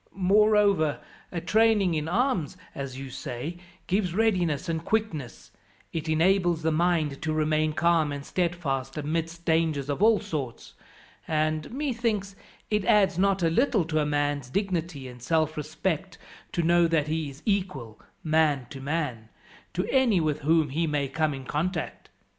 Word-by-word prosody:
"Moreover, 200 -4 +3 0.3
a 175 - -2
training 210 0 +3
in 155 -1 -1
arms, 200 - 0 0.2
as 135 -2 -6
you 135 -1 -7
say, 135 +6 -5 0.3
gives 185 -2 0
readiness 180 -9 +1
and 165 -1 -2
quickness, 170 - -3 0.4
it 160 -1 -3
enables 175 0 +2
the 160 - +2
mind 155 -3 +1
to 160 - -1
remain 155 0 +1
calm 165 -2 +2
and 140 0 -5
steadfast 155 -7 -2
amidst 165 +3 -3
dangers 160 -4 +1
of 145 - -3
all 220 0 +5
sorts, 145 - -5 0.5
and, 155 0 0
methinks, 230 -7 -2 0.4
it 210 -1 +2
adds 195 -3 +4
not 195 -1 +2
a 165 - +4
little 220 - +2
to 155 -1 0
a 150 - +1
man's 145 -3 -1
dignity 170 -6 -2
and 125 -1 -11
self 155 +3 +1
respect 155 +4 -3 0.3
to 170 - -1
know 170 +1 +4
that 165 -3 +1
he 155 -1 -2
is 140 +1 -13
equal, 180 - -2 0.2
man 155 -5 +2
to 135 - -8
man, 135 -7 -3 0.5
to 180 - 0
any 255 -8 +4
with 155 -2 0
whom 155 +1 +2
he 165 +5 0
may 145 -2 0
come 155 +3 0
in 135 -1 -8
contact. 160 - -3
160 Hz, 155 wpm, -27 LUFS, 150-185 Hz, 0.5 s, all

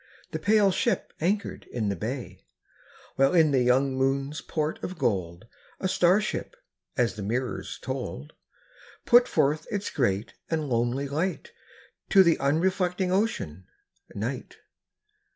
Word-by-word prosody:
The - - -3
pale 205 -2 +4
ship 235 +5 -1
anchored 200 +5 -1
in 110 -4 -1
the 100 - -1
bay, 105 -2 -6 0.7
While 135 +5 +4
in 160 -3 +5
the 130 -2 +3
young 130 +2 +3
moon's 135 +3 0
port 155 -1 -3
of 185 - -5
gold 90 - -1 0.3
A 190 - 0
star 180 +1 +4
ship 215 - -4 0.2
— - - -39
as 120 -4 +2
the - - -5
mirrors 120 +5 -3
told 70 +3 -5 0.4
— - - -24
Put 240 +1 +6
forth 150 +3 +1
its 205 -2 -3
great 105 -6 0 0.2
and 155 -2 -1
lonely 120 +3 0
light 165 +7 -2 0.6
To 195 -2 +7
the 170 -3 +3
unreflecting 180 +5 +1
Ocean, 185 - -1 0.5
Night. - - -4
140 Hz, 140 wpm, -27 LUFS, 120-185 Hz, 0.7 s, To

